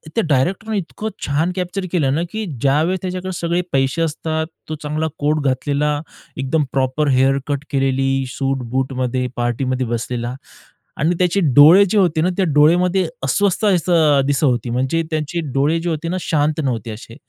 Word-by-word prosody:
त्या 230 - +2
डायरेक्टरने 190 +10 0
इतकं 200 +4 -4 0.2
छान 150 +5 0
कॅप्चर 185 +1 -3
केलं 145 -7 +1
ना, 160 - 0
की 220 0 -3 0.2
ज्यावेळेस 155 +7 +2
त्याच्याकडे 185 0 -4
सगळे 170 +1 0
पैसे 135 +4 +1
असतात. 160 0 -2 0.2
तो 155 - -2
चांगला 155 +2 -1
कोट 150 +1 0
घातलेला, 145 +3 0 0.4
एकदम 135 +4 0
प्रॉपर 135 +3 0
हेअर 135 +1 +3
कट 145 -1 -2
केलेली, 135 0 +1
सूट-बूटमध्ये 130 -1 -2
पार्टीमध्ये 125 +1 -1
बसलेला 120 +1 -3 0.6
आणि 165 +5 +1
त्याचे 180 +2 +2 0.2
डोळे 160 +8 +8
जे 215 - +1
होते 175 -5 +2
ना, 175 - +2
त्या 195 - +2
डोळेमध्ये 175 +5 +3 0.2
अस्वस्थ 195 +10 +1
असं 165 -6 +3
दिसत 145 +2 0
होती 120 -4 +1
म्हणजे 130 +7 0
त्यांचे 155 +2 -2
डोळे 145 +5 +2
जे 175 - -2
होते 160 0 -3
ना 185 - -1
शांत 150 -1 0
नव्हते 115 -4 -2
असे. 115 +1 -10
150 Hz, 160 wpm, -19 LUFS, 135-170 Hz, 0.6 s, डोळे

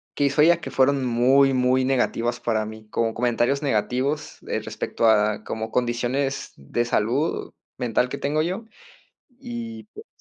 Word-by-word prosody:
que 145 - +1
hizo 140 +2 +2
ella 170 +2 +5
que 165 - -7
fueron 135 0 +2
muy, 130 +3 +4
muy 130 0 +2
negativas 120 -2 0
para 110 -3 0
mí. 110 0 -10
Con 115 +1 0
comentarios 120 +4 +1
negativos, 135 +3 -1
eh, - - -1
respecto 115 - -1
a 105 -1 +3
como 110 0 -5
condiciones 125 +3 -1
de 95 +13 -2
salud 120 +8 0 0.3
mental 125 0 0
que - - -4
tengo 150 +2 0
yo. 185 +7 -3 0.7
Y 235 -3 -7
pues, 435 +2 -11
125 Hz, 155 wpm, -24 LUFS, 115-140 Hz, 0.7 s, ella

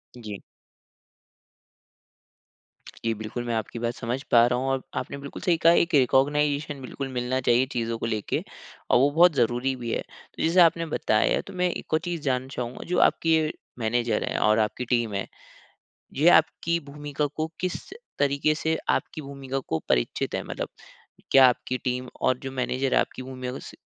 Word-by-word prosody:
जी। 105 -5 -7 2.6
जी 115 - -2
बिल्कुल 110 +3 -5
मैं 120 - -2
आपकी 110 +1 -4
बात 120 +1 -1
समझ 125 +2 -3
पा 120 -1 +7
रहा 125 0 0
हूँ 130 - -2
और 135 -1 0 0.2
आपने - - -6
बिल्कुल 140 0 -8
सही 175 -4 +2
कहा, 165 +1 +5
एक 170 - +2
रिकॉग्नाइजेशन 145 +2 +2
बिल्कुल 135 +2 -5
मिलना 125 +1 -1
चाहिए, 125 +1 +3
चीज़ 115 -1 -2
को 115 - -3
लेके 110 -3 -2 0.5
और - - +5
वो 140 +3 +5
बहुत 170 +3 +6
ज़रूरी 125 +1 +1
भी 120 -2 -5
है। - - -1
तो - - -10
जैसे 165 +3 +3
आपने 165 0 +4
बताया, 110 -8 +1
तो 200 - -11
मैं 180 -1 +1
एक - - -7
और 155 - +4
चीज़ 170 -1 -4
जानना 130 -2 -1
चाहूँगा 120 0 -5
जो 180 - 0
आपकी 165 -1 +4 0.4
मैनेजर 115 -1 0
है - - -2
और 110 +1 +3
आपकी 110 +3 -1
टीम 120 -3 0
है, 100 -1 -2 0.9
ये 150 +5 +3
आपकी 170 +1 +3
भूमिका 145 0 -3
को 155 +2 -3
किस 185 -1 -4 0.3
तरीके 140 +2 +2
से 160 +1 0
आपकी - - -1
भूमिका 135 -1 -5
को 80 -11 -2
परिचित - - 0
है? - - -1
मतलब - - -4 0.6
क्या 135 -1 +8
आपकी 125 +1 -1
टीम 125 0 -3
और 130 - +2
जो 135 - -6
मैनेजर 130 0 -1
है - - +6
आपकी - - -4
भूमिका 130 -1 -6
को 135 - -6
स - - -10
130 Hz, 180 wpm, -26 LUFS, 120-150 Hz, 2.6 s, क्या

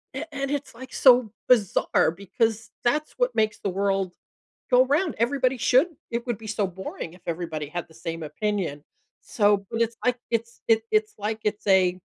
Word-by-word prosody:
and 270 - -3
and 275 -1 -3
it's, 285 -1 -3
like, 260 +2 -10
so 245 -4 +6 0.2
bizarre 215 -10 +3
because 220 +5 -2
that's 300 +6 +1
what - - +1
makes 215 -1 +1
the 200 - -2
world 195 -1 0 0.6
go 250 0 +6
'round. 310 +6 +1
Everybody 255 +2 +1
should 260 +7 +4 0.2
it 235 +1 -3
would 240 -2 -1
be 220 - -10
so 205 -1 0
boring 185 -2 -7
if 180 - -18
everybody 165 -3 -3
had 175 +3 -5
the 160 - -19
same 165 0 -5
opinion. 180 -5 -2 0.4
So 205 -2 +2
but, 230 -1 -3
it's, 230 0 -1
like, 250 0 +2
it's 230 0 -2
it's 225 0 +3
it's 215 0 +1
like 215 +2 -3
it's 210 0 -2
a 185 -2 +4
220 Hz, 185 wpm, -25 LUFS, 190-250 Hz, 0.6 s, so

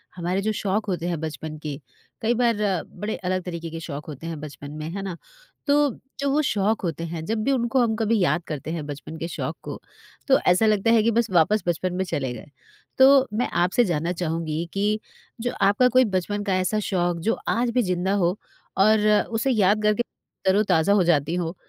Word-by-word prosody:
हमारे 180 +2 -1
जो 215 - 0
शौक 210 0 -1
होते 175 -1 -2
हैं 170 -3 -2
बचपन 155 0 -5
की 145 -2 -4 0.4
कई 225 +2 +2
बार 240 -1 +2 0.3
बड़े 210 +1 -5
अलग 185 0 -2
तरीके 170 -2 -5
के 165 0 -6
शौक 150 -3 -6
होते 155 +1 -7
हैं 165 -3 -5
बचपन 145 -1 -9
में, 155 +1 -6
है 195 +3 -5
ना? 190 -3 -4 0.5
तो 290 0 +4 0.3
जो 280 - 0
वो 300 +2 +3
शौक 215 -5 0
होते 165 -2 -3
हैं 165 -1 -5
जब 215 +2 -1
भी 275 - +1
उनको 255 0 +2
हम 225 -2 +1
कभी 220 0 +1
याद 170 -1 +1
करते 155 0 -5
हैं 160 -3 -4
बचपन 150 +2 -7
के 165 - -4
शौक - - -4
को - - -6 0.5
तो 270 - +5
ऐसा 180 +5 +5
लगता 215 +1 +3
है 225 -2 +5
कि 230 - +3
बस 230 0 +1
वापस 185 +5 +3
बचपन 175 +1 0
में 190 - 0
चले 135 -7 -2
गए। 120 +4 -10 0.5
तो 270 0 +7
मैं 230 +4 0 0.2
आपसे 205 +7 +3
जानना 170 -1 -1
चाहूँगी 165 -1 -2
कि 210 +2 +1 0.4
जो 245 +1 -1
आपका 205 +6 +4
कोई 255 +1 +5
बचपन 205 +3 -1
का 195 -2 0
ऐसा 185 +4 0
शौक 175 -2 0
जो - - +1
आज 240 +1 +1
भी 250 - +2
ज़िंदा 185 0 0
हो 175 +4 +1 0.4
और 215 +2 +4 0.2
उसे 230 +4 +1
याद 210 -2 +3
करके 210 +2 +2 0.4
तरोताज़ा 190 -2 +3
हो 200 -3 +4
जाती 160 -1 +2
हो? 175 -1 -2
190 Hz, 205 wpm, -24 LUFS, 165-220 Hz, 0.5 s, तो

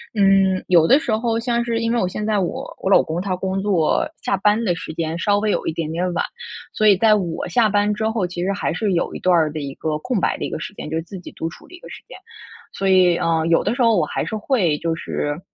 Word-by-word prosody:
嗯， 195 -2 +3
有 170 -3 +5
的 270 - +6
时 275 -6 -3
候 225 0 -1
像 235 0 0
是 230 -1 -1
因 230 0 0
为 240 - +1
我 185 - +1
现 210 +3 -4
在 215 -1 +1
我 180 - -4
我 - - -1
老 195 - +6
公 165 +2 -3
他 190 -1 -2
工 190 +1 -2
作 190 -6 +1 0.2
下 - - +1
班 210 +4 +2
的 185 -6 +1
时 160 - -7
间 160 0 -3
稍 205 +3 +2
微 210 0 0
有 - - -1
一 - - -1
点 160 -1 -3
点 180 +2 -1
晚， 175 - 0 0.5
所 215 - +2
以 200 -2 +6
在 215 +2 +5
我 175 -5 -3
下 235 -3 +3
班 205 0 +1
之 220 +1 -1
后， 220 -4 -1
其 175 0 -5
实 195 - 0
还 200 - -2
是 210 -4 -1
有 170 - -1
一 - - -6
段 180 -1 +3
儿 155 -2 +2
的 155 - -5
一 140 -2 -6
个 155 -1 -2
空 245 +6 -2
白 - - 0
的 - - -4
一 - - -4
个 - - -5
时 210 - -7
间， 150 - -8
就 160 - -2
是 165 - -3
自 185 +3 -9
己 175 - -11
独 165 - -4
处 - - -15
的 360 - -13
一 - - -14
个 - - -13
时 - - -10
间。 - - -11 0.6
所 195 - -2
以 180 -2 +4
嗯， 165 -1 0
有 165 - +3
的 210 - -1
时 250 - -2
候 230 -1 +4
我 165 - +2
还 - - -3
是 220 - -4
会 205 - +1
就 165 0 -1
是 145 -2 -3
190 Hz, 315 characters per minute, -21 LUFS, 170-215 Hz, 0.6 s, 的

